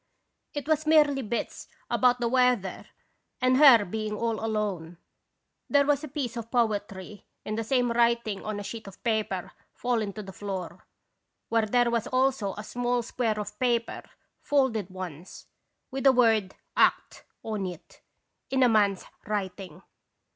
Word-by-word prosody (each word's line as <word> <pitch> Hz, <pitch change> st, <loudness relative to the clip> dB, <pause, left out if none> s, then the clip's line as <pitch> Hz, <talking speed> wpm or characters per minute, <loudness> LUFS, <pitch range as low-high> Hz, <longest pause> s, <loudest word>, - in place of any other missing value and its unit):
It 290 Hz, 0 st, -4 dB
was 310 Hz, -1 st, +1 dB
merely 295 Hz, -3 st, +4 dB
bits 235 Hz, 0 st, -4 dB, 0.2 s
about 250 Hz, -1 st, +3 dB
the 240 Hz, -, 0 dB
weather 250 Hz, -6 st, +1 dB, 0.5 s
and 255 Hz, 0 st, +3 dB
her 260 Hz, -7 st, +8 dB
being 215 Hz, +2 st, -3 dB
all 230 Hz, 0 st, -2 dB
alone. 200 Hz, -7 st, -2 dB, 0.7 s
There 285 Hz, -1 st, +4 dB
was 290 Hz, 0 st, +1 dB
a -, -, -4 dB
piece 265 Hz, -4 st, -4 dB
of 230 Hz, -1 st, -6 dB
poetry 205 Hz, -4 st, -2 dB, 0.2 s
in 215 Hz, -, -3 dB
the 225 Hz, +1 st, -2 dB
same 245 Hz, +1 st, +1 dB
writing 235 Hz, -3 st, +1 dB
on 215 Hz, -1 st, -4 dB
a -, -, -5 dB
sheet 220 Hz, +1 st, -7 dB
of 195 Hz, -, -13 dB
paper 215 Hz, -5 st, -1 dB, 0.2 s
fallen 230 Hz, -4 st, -1 dB
to 215 Hz, -, -7 dB
the 190 Hz, -1 st, -10 dB
floor, 185 Hz, -4 st, -6 dB, 0.6 s
where 225 Hz, -1 st, +2 dB
there 245 Hz, +2 st, +2 dB
was 235 Hz, -1 st, 0 dB
also 255 Hz, -6 st, 0 dB
a 210 Hz, -, -7 dB
small 245 Hz, +2 st, -1 dB
square 225 Hz, -2 st, -1 dB
of 210 Hz, 0 st, -7 dB
paper, 240 Hz, -2 st, 0 dB, 0.4 s
folded 255 Hz, -9 st, +1 dB
once, 185 Hz, -2 st, -8 dB, 0.5 s
with 270 Hz, +1 st, -4 dB
the 270 Hz, -, +8 dB
word 225 Hz, -6 st, +3 dB, 0.2 s
'Act/' -, -, +2 dB, 0.2 s
on 210 Hz, -4 st, -3 dB
it, 175 Hz, -1 st, -11 dB, 0.5 s
in 265 Hz, -1 st, +2 dB
a 250 Hz, -, +5 dB
man's 205 Hz, -4 st, +2 dB, 0.2 s
writing. 190 Hz, -5 st, -4 dB
225 Hz, 155 wpm, -27 LUFS, 205-250 Hz, 0.7 s, her